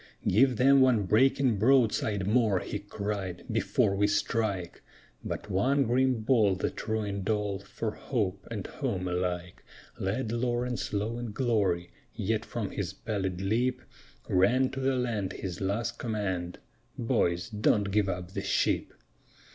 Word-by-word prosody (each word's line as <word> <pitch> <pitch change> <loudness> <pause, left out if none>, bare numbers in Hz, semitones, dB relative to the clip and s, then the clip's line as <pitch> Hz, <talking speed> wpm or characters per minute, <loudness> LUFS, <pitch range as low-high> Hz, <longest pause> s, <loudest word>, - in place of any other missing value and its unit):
"Give 125 +6 +4
them 135 +2 +6
one 125 -5 +4
breaking 125 +3 +3
broadside 110 -4 +3
more," 110 -2 +3
he 105 - -4
cried, 100 -3 -4
"before 100 - +1
we 105 +1 +3
strike!" 105 -3 -1 0.4
But - - -5
one 130 +9 +3
grim 125 0 +2
ball 110 -5 +3
that 95 - -4
ruined 105 -3 -2
all 105 -2 0
for 105 +3 -4
hope 100 -6 -3
and 105 -5 -4
home 100 -10 -3
alike 90 0 -3 0.4
Laid 110 +4 -1
Lawrence 120 +1 -1
low 110 +3 -2
in 120 -3 -5
glory, 100 -8 0 0.2
yet 110 +2 -1
from - - -4
his - - -3
pallid 95 -4 -3
lip 120 +6 +1 0.5
Rang 125 +8 +3
to 135 - -5
the 135 0 +1
land 115 -7 -1
his 90 -2 -6
last 115 +5 -2
command: 95 -6 -2 0.4
"Boys, 110 -6 0
don't 105 -1 +2
give 100 -1 +2
up 90 -1 -4
the - - -2
ship!" - - 0
105 Hz, 140 wpm, -29 LUFS, 95-120 Hz, 0.5 s, them